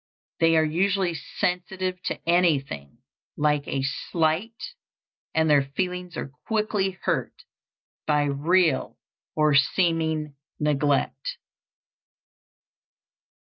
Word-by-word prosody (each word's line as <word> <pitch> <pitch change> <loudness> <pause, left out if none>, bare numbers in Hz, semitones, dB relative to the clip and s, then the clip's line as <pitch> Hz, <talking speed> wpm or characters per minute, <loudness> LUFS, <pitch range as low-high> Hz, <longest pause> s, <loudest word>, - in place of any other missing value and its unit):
They 165 0 +4
are 160 - +5
usually 185 +3 +1
sensitive 180 +3 -3
to - - -2
anything 140 - +1 0.3
like 150 -1 +1
a 135 -1 -1
slight, 165 - -1 0.6
and 160 0 +3
their 145 -2 +5
feelings 180 +5 -4
are 140 - -5 0.2
quickly 210 -4 0
hurt - - -2 0.6
by 150 -1 +3
real 160 +5 +1 0.4
or 150 -1 +3
seeming 160 +1 +2 0.3
neglect. 150 - 0
160 Hz, 90 wpm, -25 LUFS, 150-180 Hz, 0.6 s, are